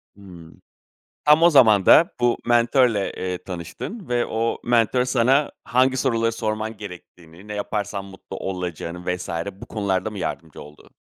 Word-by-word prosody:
Hımm. 90 -5 -14 0.6
Tam 150 +2 +6
o 170 - +8
zaman 110 - +5
da 170 +4 +6
bu 120 -1 +2
mentörle, 120 -3 +2
eee, 90 -1 -4
tanıştın 95 - -7
ve 120 -1 +1
o 115 +1 -1
mentör 120 +1 +2
sana 130 +3 +2
hangi 130 +1 +2
soruları 115 -3 +1
sorman 110 -1 -3
gerektiğini, 90 -2 -12
ne 105 - -6
yaparsan 100 -1 -3
mutlu 95 0 -10
olacağını 90 -1 -4
vs. 90 - -8 0.2
bu 95 - -12
konularda 100 -1 -2
mı 105 - -8
yardımcı 80 -3 -5
oldu? 75 +1 -15
110 Hz, 145 wpm, -22 LUFS, 95-120 Hz, 0.6 s, o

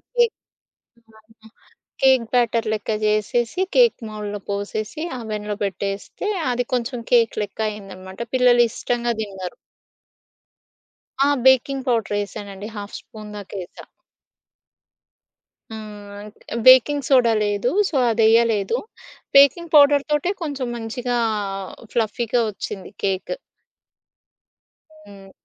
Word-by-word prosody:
Cake 475 -2 +3 0.8
ఆహ్, 220 0 -24 0.2
ఇ - - -12 0.5
cake 260 -3 +5
batter 235 -2 +2
లెక్క 215 +1 -3
జేసేసి 215 - 0
కేక్ 485 -2 +5
మౌల్లో 210 -1 -5
పోసేసి 210 +7 -4 0.2
అవెన్‌లో 210 -2 -4
పెట్టేస్తే 200 - -4 0.2
అది 245 0 -1
కొంచెం 245 0 -1
కేక్ 230 -2 +4
లెక్క 205 +2 -9
అయిందన్నమాట. 190 -2 -10 0.2
పిల్లలు 245 -1 +5
ఇష్టంగా 240 -1 -1
దిన్నరు. 195 0 -6 1.7
ఆ! - - +3 0.2
బేకింగ్ 265 +1 +4
పౌడరేసానండి 205 -3 -2
హాఫ్ 205 0 -7
స్పూన్ 215 -1 -12
దాక 200 -1 -10
ఏసా. 175 - -13 1.9
హ్మ్. 210 -1 -9 0.3
బేకింగ్ 260 +2 +7
సోడా 245 -4 +4
లేదు, 205 +4 0 0.2
సో 300 - -6 0.2
అదెయ్యలేదు. 225 -1 +3 0.6
బేకింగ్ 305 +4 +5
పౌడర్‌తోటే 290 +2 +4
కొంచెం 285 -5 -3
మంచిగా, 240 +2 -3 0.8
ఫ్లఫీగా 235 +1 0
ఒచ్చింది 195 -1 -7
కేక్. 195 - -1 1.7
హ్మ్. 195 -1 -14
225 Hz, 95 wpm, -22 LUFS, 205-250 Hz, 1.9 s, బేకింగ్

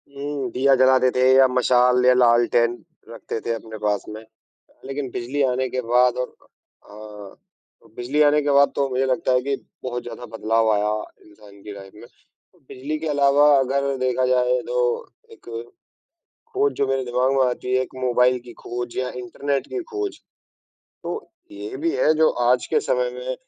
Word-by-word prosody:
हुँ, 140 -2 -4
दिया 135 +3 +3
जलाते 130 0 +4
थे 125 - -1
या 135 0 +6
मशाल 125 0 +3
या 125 - +6
लालटेन 120 -1 +3 0.3
रखते 115 0 -6
थे 115 - 0
अपने 110 -1 -8
पास 105 -1 -1
में 110 +1 -8
अ, 110 0 -33
लेकिन 135 0 -4
बिजली 130 +5 -3
आने 130 0 0
के 130 - -2
बाद 125 +1 +3
और 125 0 -4 0.6
हाँ 105 -1 -11 0.5
अ, - - -20
बिजली 130 +5 -1
आने 150 0 +4
के 145 0 0
बाद 140 0 +5
तो 140 - +1
मुझे 130 +1 0
लगता 130 +2 0
है 125 - +3
कि 140 +2 -1 0.3
बहुत 125 -1 -4
ज़्यादा 120 +1 -8
बदलाव 110 0 +1
आया 105 0 +1 0.3
इंसान 105 -1 -17
की 105 - -8
लाइफ 95 -1 -12
में। 115 - -13 0.6
बिजली 140 +4 -5
के 160 - -4
अलावा 145 0 +4
अगर 135 +1 0
देखा 130 0 0
जाए 125 0 +2
तो - - -2 0.5
एक 435 -3 -17 1.1
खोज 420 +1 +2
जो 140 - +2
मेरे 135 0 -1
दिमाग 125 +2 +1
में 135 - +4
आती 125 +1 -4
है, 130 - +2
एक 130 - -8
मोबाईल 125 0 +2
की 120 - -11
खोज 120 0 -5
या 130 0 -1
इंटरनेट 140 +3 -3
की 390 - -4
खोज। 410 -2 -4 0.8
तो, 445 - -6 0.2
ये 395 +5 -8
भी 335 -1 -1
है 155 - +3
जो 160 0 +4 0.2
आज 125 0 +2
के 455 - +1
समय - - -1
में - - -5
130 Hz, 180 wpm, -22 LUFS, 120-140 Hz, 1.1 s, या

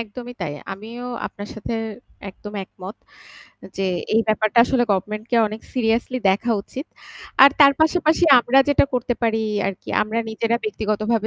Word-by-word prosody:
একদমই 240 +2 -8
তাই। 155 -5 -3 0.2
আমিও 225 +5 -9 0.2
আপনার 205 0 -9
সাথে 220 +2 -5 0.6
একদম 205 +2 -11
একমত 190 +3 -11 0.8
যে 195 - -1 0.3
এই 225 - +5
ব্যাপারটা 215 +1 +1
আসলে 250 -1 +1
গভর্নমেন্ট 210 +3 -3
কে 240 - +2
অনেক 215 +1 -8
সিরিয়াসলি 240 +1 0
দেখা 205 +5 -1
উচিত। 270 +9 -8 0.6
আর 275 - +10
তার 280 -1 +8
পাশাপাশি 320 +1 +3 0.2
আমরা 255 +3 +3
যেটা 285 - +4
করতে 245 0 -1
পারি 225 -1 +1 0.2
আরকি, 195 -2 -6
আমরা 215 +2 -3
নিজেরা 230 +1 0
ব্যক্তিগতভাবে 215 +1 -1
225 Hz, 150 wpm, -21 LUFS, 210-245 Hz, 0.8 s, আর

